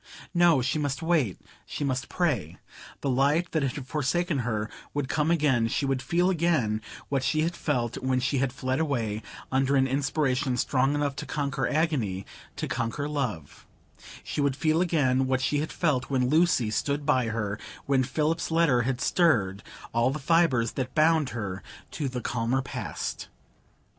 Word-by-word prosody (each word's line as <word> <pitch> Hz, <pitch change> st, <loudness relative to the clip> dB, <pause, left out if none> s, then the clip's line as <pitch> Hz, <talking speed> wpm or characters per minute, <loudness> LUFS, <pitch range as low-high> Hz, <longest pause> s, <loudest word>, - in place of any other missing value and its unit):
No, 170 Hz, -7 st, +4 dB
she 130 Hz, +5 st, 0 dB
must 145 Hz, +2 st, -2 dB
wait; 160 Hz, -, +1 dB, 0.2 s
she -, -, -5 dB
must 130 Hz, -2 st, -1 dB
pray; 125 Hz, -, -1 dB, 0.4 s
the 140 Hz, -, -1 dB
light 145 Hz, +7 st, +2 dB
that 160 Hz, -, +1 dB
had 135 Hz, 0 st, -2 dB
forsaken 150 Hz, +3 st, 0 dB
her 110 Hz, -3 st, -1 dB, 0.3 s
would 145 Hz, -2 st, -1 dB
come 150 Hz, +3 st, 0 dB
again; 145 Hz, -9 st, +3 dB
she 140 Hz, -, -1 dB
should 135 Hz, -1 st, 0 dB
feel 175 Hz, +7 st, +2 dB
again 155 Hz, -, +1 dB, 0.3 s
what 135 Hz, -2 st, 0 dB
she 155 Hz, +2 st, +1 dB
had 170 Hz, +2 st, -1 dB
felt 120 Hz, -8 st, -1 dB
when 130 Hz, -1 st, +1 dB
she 130 Hz, +2 st, 0 dB
had 135 Hz, -1 st, +1 dB
fled 130 Hz, +1 st, -2 dB
away, 115 Hz, -9 st, -1 dB, 0.3 s
under 135 Hz, +1 st, +2 dB
an 135 Hz, -1 st, +4 dB
inspiration 135 Hz, -1 st, 0 dB
strong 135 Hz, +3 st, +1 dB
enough 145 Hz, -1 st, -1 dB
to 150 Hz, -, -5 dB
conquer 140 Hz, -3 st, -1 dB
agony,—to 130 Hz, -, -2 dB
conquer 125 Hz, +5 st, -2 dB
love; 125 Hz, -, -4 dB, 0.6 s
she -, -, -3 dB
should 140 Hz, -2 st, +1 dB
feel 155 Hz, +3 st, +2 dB
again 135 Hz, -7 st, +2 dB
what 130 Hz, -1 st, +1 dB
she 145 Hz, +3 st, +1 dB
had 155 Hz, -, -3 dB
felt 145 Hz, -7 st, 0 dB
when 130 Hz, -2 st, +1 dB
Lucy 155 Hz, -8 st, +3 dB
stood 145 Hz, +6 st, -1 dB
by 130 Hz, -5 st, +2 dB
her, 105 Hz, -2 st, -2 dB, 0.3 s
when 135 Hz, -1 st, +3 dB
Philip's 155 Hz, +6 st, -1 dB
letter 160 Hz, -7 st, +3 dB
had 130 Hz, +1 st, -1 dB
stirred 105 Hz, -, +2 dB, 0.3 s
all 115 Hz, +2 st, +3 dB
the 140 Hz, -, -2 dB
fibres 140 Hz, -6 st, +2 dB
that 130 Hz, -2 st, -4 dB
bound 155 Hz, -2 st, +4 dB
her 100 Hz, -5 st, -4 dB, 0.3 s
to 145 Hz, -4 st, -2 dB
the 125 Hz, -1 st, -4 dB
calmer 120 Hz, +3 st, 0 dB
past. 125 Hz, -6 st, -5 dB
135 Hz, 170 wpm, -27 LUFS, 125-155 Hz, 0.6 s, No